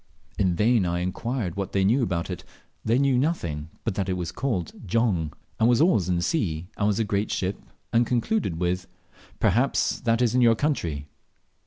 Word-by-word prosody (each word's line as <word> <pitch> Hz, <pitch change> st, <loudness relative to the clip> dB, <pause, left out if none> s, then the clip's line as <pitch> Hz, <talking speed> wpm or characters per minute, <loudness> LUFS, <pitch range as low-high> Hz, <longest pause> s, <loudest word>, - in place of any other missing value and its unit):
In 95 Hz, -3 st, +2 dB
vain 110 Hz, +3 st, +3 dB
I 85 Hz, 0 st, -1 dB
inquired 95 Hz, +1 st, -2 dB
what 100 Hz, -1 st, -4 dB
they 95 Hz, -1 st, +2 dB
knew 120 Hz, +7 st, +3 dB
about 85 Hz, -7 st, -1 dB
it; -, -, -6 dB, 0.4 s
they 115 Hz, +2 st, +2 dB
knew 135 Hz, -2 st, +3 dB
nothing 85 Hz, -, -1 dB
but 115 Hz, -, -1 dB
that 95 Hz, 0 st, -2 dB
it -, -, +1 dB
was 85 Hz, -2 st, -3 dB
called 105 Hz, -11 st, -2 dB, 0.2 s
"Jong," 90 Hz, -7 st, +1 dB, 0.3 s
and 115 Hz, -, +4 dB
was 120 Hz, -1 st, +4 dB
always 145 Hz, -, +3 dB
in 90 Hz, -, +2 dB
the 85 Hz, -, 0 dB
sea, 90 Hz, -, -1 dB
and 105 Hz, -, +1 dB
was 105 Hz, -1 st, +1 dB
a 115 Hz, -, +2 dB
very 105 Hz, -, -7 dB
great 100 Hz, +1 st, 0 dB
ship, 95 Hz, +1 st, -2 dB, 0.3 s
and 115 Hz, +1 st, +5 dB
concluded 120 Hz, -, 0 dB
with, 90 Hz, +1 st, -1 dB, 0.5 s
"Perhaps 125 Hz, +8 st, +2 dB
that 115 Hz, -2 st, +2 dB
is 120 Hz, -2 st, +2 dB
your 120 Hz, -2 st, +5 dB
country?" 85 Hz, -, -1 dB
100 Hz, 195 wpm, -25 LUFS, 90-120 Hz, 0.5 s, and